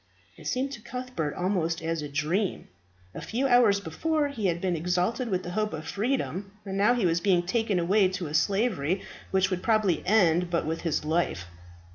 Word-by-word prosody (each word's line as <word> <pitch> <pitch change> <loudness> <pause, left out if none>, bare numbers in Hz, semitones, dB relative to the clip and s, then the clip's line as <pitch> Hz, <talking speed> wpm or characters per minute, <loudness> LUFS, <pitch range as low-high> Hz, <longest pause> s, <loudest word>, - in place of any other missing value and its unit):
It - - -10
seemed 265 +2 -1
to 235 - -8
Cuthbert 240 - -4
almost 175 -3 -1
as 165 -1 -1
a 150 - -5
dream. 160 +8 -1 0.5
A - - -7
few 250 +5 -2
hours 245 -6 +5
before 290 - -1
he 225 -8 -2
had 170 -1 0
been 180 -1 0
exalted 180 +9 0
with 185 -2 -1
the 175 - -5
hope 215 +1 -1
of 155 0 -5
freedom; 205 -3 -2
now 200 +5 +2
he 235 -6 +1
was 170 0 +2
being 180 -3 +2
taken 220 0 0
away 190 +3 +3
to 185 -1 -4
a 150 - -6
slavery 190 - +1 0.3
which 190 0 +2
would 180 -1 -1
probably 215 -5 +2
end 180 -4 +4
but 170 -1 0
with 160 +1 -2
his 160 -3 -1
life. 155 - 0
190 Hz, 190 wpm, -27 LUFS, 170-220 Hz, 0.5 s, hours